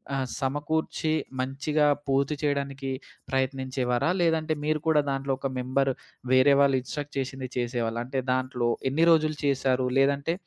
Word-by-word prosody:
ఆహ్, 135 Hz, -1 st, 0 dB
సమకూర్చి 150 Hz, +3 st, -1 dB, 0.3 s
మంచిగా 140 Hz, +3 st, 0 dB, 0.2 s
పూర్తి 140 Hz, +2 st, +1 dB
చెయడానికి 140 Hz, -2 st, -2 dB, 0.4 s
ప్రయత్నించేవారా? 130 Hz, 0 st, 0 dB
లేదంటే, 160 Hz, -1 st, +2 dB
మీరు 155 Hz, -1 st, 0 dB
కూడా 150 Hz, -2 st, +5 dB
దాంట్లో 135 Hz, 0 st, -1 dB
ఒక 135 Hz, -, -2 dB
మెంబరు, 135 Hz, +1 st, +1 dB, 0.4 s
వేరే 130 Hz, +2 st, +6 dB
వాళ్ళు 135 Hz, -1 st, +4 dB
ఇన్స్ట్రక్ట్ 145 Hz, +4 st, -6 dB
చేసింది 130 Hz, -1 st, -4 dB
చేసేవాళ్ళా? 120 Hz, -1 st, -1 dB
అంటే, 130 Hz, 0 st, -2 dB
దాంట్లో 130 Hz, -2 st, -1 dB, 0.2 s
ఎన్ని 160 Hz, +5 st, +3 dB
రోజులు 155 Hz, -2 st, +3 dB
చేశారు? 130 Hz, -2 st, +1 dB
లేదంటే, 140 Hz, +4 st, +2 dB
135 Hz, 130 wpm, -27 LUFS, 130-145 Hz, 0.4 s, వేరే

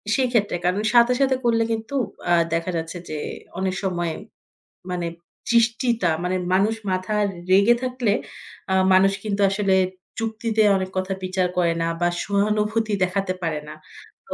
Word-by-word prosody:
সেই 260 Hz, -1 st, +2 dB
ক্ষেত্রে 205 Hz, -6 st, +1 dB
কারণ 180 Hz, +4 st, +1 dB
সাথে, 240 Hz, +1 st, +6 dB
সাথে 265 Hz, -1 st, +3 dB
করলে 230 Hz, -1 st, +3 dB
কিন্তু 225 Hz, +4 st, -3 dB, 0.4 s
আ -, -, +6 dB, 0.2 s
দেখা 165 Hz, +2 st, -1 dB
যাচ্ছে 165 Hz, +2 st, -5 dB
যে 155 Hz, -, -4 dB, 0.4 s
অনেক 190 Hz, 0 st, -1 dB
সময় 175 Hz, -3 st, -1 dB, 0.8 s
মানে 175 Hz, -1 st, -2 dB, 0.4 s
জিসটিতা 235 Hz, -3 st, +2 dB
মানে 180 Hz, +1 st, 0 dB, 0.2 s
মানুষ 205 Hz, +4 st, +3 dB, 0.2 s
মাথা 185 Hz, +3 st, -2 dB, 0.4 s
রেগে 200 Hz, +5 st, +6 dB
থাকলে 250 Hz, -4 st, 0 dB, 0.6 s
আ -, -, +3 dB, 0.2 s
মানুষ 190 Hz, +1 st, +5 dB
কিন্তু 205 Hz, -2 st, -2 dB
আসলে 195 Hz, 0 st, +1 dB, 0.5 s
যুক্তিতে 225 Hz, 0 st, -1 dB, 0.2 s
অনেক 190 Hz, 0 st, -3 dB
কথা 185 Hz, +1 st, -1 dB
বিচার 185 Hz, 0 st, 0 dB
করে 170 Hz, -2 st, +3 dB
না 165 Hz, -, 0 dB
বা 175 Hz, -, +3 dB, 0.2 s
সহানুভূতি 210 Hz, +2 st, 0 dB
দেখাতে 185 Hz, 0 st, -1 dB
পারে 160 Hz, -3 st, -1 dB
না। 150 Hz, -, -7 dB, 0.5 s
তো -, -, -5 dB
200 Hz, 150 wpm, -23 LUFS, 185-225 Hz, 0.8 s, সাথে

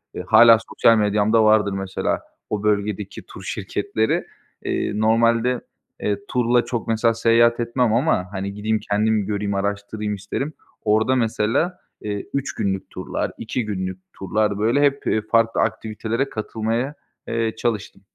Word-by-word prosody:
Eee, -, -, -4 dB
hâlâ 115 Hz, +2 st, +8 dB
sosyal 115 Hz, 0 st, +4 dB
medyamda 105 Hz, +1 st, +3 dB
vardır 110 Hz, -2 st, +4 dB
mesela 95 Hz, -1 st, -2 dB, 0.3 s
o 105 Hz, -1 st, -2 dB
bölgedeki 105 Hz, -1 st, -1 dB
tur -, -, -12 dB
şirketleri. 110 Hz, 0 st, -1 dB, 0.4 s
Eee, -, -, -1 dB
normalde, 115 Hz, +2 st, +3 dB, 0.4 s
eee, 100 Hz, -1 st, 0 dB
turla 120 Hz, -1 st, +2 dB
çok, 120 Hz, -2 st, -3 dB
mesela, 115 Hz, +1 st, +2 dB
seyahat 115 Hz, +1 st, +3 dB
etmem 120 Hz, -1 st, +1 dB
ama, 120 Hz, -, +1 dB
hani, 100 Hz, 0 st, -4 dB
gideyim, 110 Hz, +2 st, -1 dB
kendim 105 Hz, 0 st, +1 dB
göreyim, 100 Hz, 0 st, -2 dB
araştırayım 100 Hz, +1 st, -2 dB
isterim. 105 Hz, +10 st, -4 dB, 0.3 s
Orada, 110 Hz, +4 st, +3 dB
mesela, 115 Hz, -, 0 dB, 0.2 s
eee, 105 Hz, -1 st, -4 dB
3 140 Hz, -1 st, -2 dB
günlük 95 Hz, -1 st, -2 dB
turlar, -, -, -3 dB
2 115 Hz, +1 st, -3 dB
günlük 95 Hz, -3 st, -4 dB
turlar, 105 Hz, +1 st, -1 dB
böyle 115 Hz, +7 st, +2 dB
hep, 140 Hz, -1 st, +1 dB
eee, 110 Hz, -, +2 dB
farklı 115 Hz, +1 st, +2 dB
aktivitelere 115 Hz, +4 st, -2 dB
katılmaya, 115 Hz, +5 st, -2 dB, 0.3 s
eee, 115 Hz, -1 st, -1 dB
çalıştım. 110 Hz, -4 st, -3 dB
110 Hz, 140 wpm, -22 LUFS, 105-115 Hz, 0.4 s, hâlâ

